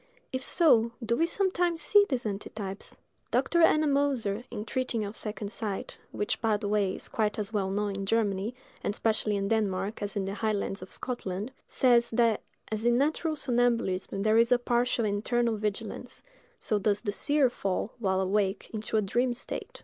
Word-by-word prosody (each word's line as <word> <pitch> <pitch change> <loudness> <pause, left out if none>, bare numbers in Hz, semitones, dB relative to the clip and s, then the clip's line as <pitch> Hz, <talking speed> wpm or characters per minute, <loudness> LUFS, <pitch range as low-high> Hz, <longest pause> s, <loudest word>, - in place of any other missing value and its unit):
If 260 - -1
so, 235 -8 +4
do 235 +1 +2
we 330 +6 +2
sometimes 350 -3 +1
see 410 +5 +6
these 260 -3 -1
antitypes? 200 -1 -5 0.3
Dr. 340 - +2
Ennemoser, 280 -9 +3
in 210 - -5
treating 235 -3 -1
of 205 +2 -6
second 210 -1 -4
sight—which, 205 -1 -3
by 220 -2 +2
the 205 -1 -4
way, 200 -2 +1
is - - -4
quite 210 -2 -1
as 210 0 -3
well 195 -2 0
known 205 +1 -1
in 195 0 -4
Germany, 210 0 0 0.3
and 205 - -1
especially 215 -2 +1
in 195 0 -1
Denmark, 210 -1 0
as 205 -1 -3
in 200 -2 -1
the 195 - -3
highlands 205 -2 -1
of 185 - -10
Scotland—says, 240 +2 0
that 230 -2 +3 0.3
as 215 0 -2
in 240 0 +4
natural 310 +3 +1
somnambulism 235 -8 0
there 220 +1 +4
is 235 +1 +4
a 250 - +6
partial 240 -1 +1
internal 225 +3 +1
vigilance, 210 -1 -4 0.3
so 215 - -1
does 205 0 +1
the 205 - 0
seer 285 +5 +2
fall, 200 -3 -2
while 190 -3 +1
awake, 195 +1 0
into 220 0 -2
a 215 - +2
dream 240 +5 +1
state. 245 - -6
220 Hz, 170 wpm, -29 LUFS, 205-245 Hz, 0.3 s, see